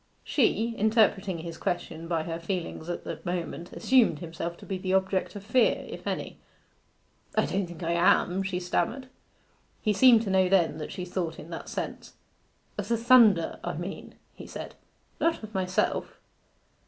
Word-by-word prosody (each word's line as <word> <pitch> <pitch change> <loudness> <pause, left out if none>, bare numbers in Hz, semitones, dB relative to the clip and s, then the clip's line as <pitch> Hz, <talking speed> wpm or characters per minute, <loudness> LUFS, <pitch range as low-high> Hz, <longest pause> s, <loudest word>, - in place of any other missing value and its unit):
She, 230 -3 +1
interpreting 205 -4 +3
his 165 0 -7
question 165 -2 -3
by 165 -2 0
her 165 0 -4
feelings 170 -1 -4
at 175 - -4
the - - -5
moment, 175 -1 -4
assumed 245 - +3
himself 170 +1 -5
to - - -13
be 190 -1 -3
the 185 0 0
object 190 0 0
of 200 - -7
fear, 235 +4 +2
if - - -8
any. - - -4 1.0
'I - - +3
don't 190 -1 -1
think 175 0 -9
I 165 - 0
am,' 175 +2 +3
she 190 -2 -2
stammered. 225 +9 -1 0.7
He 210 - +1
seemed 230 +2 +6
to 200 - -2
know 190 -1 +4
that 165 -5 +1
she 180 - -5
thought 175 -3 -3
in 165 - -10
that 165 - -6
sense. - - -5 0.7
'Of 205 - -3
the 230 +1 +1
thunder, 230 -7 +5
I 175 - -2
mean,' 175 +4 -7 0.2
he - - -11
said; - - -7 0.5
'not 330 -7 +1
of 215 0 -9
myself. 185 -1 -1
185 Hz, 165 wpm, -28 LUFS, 170-210 Hz, 1.0 s, seemed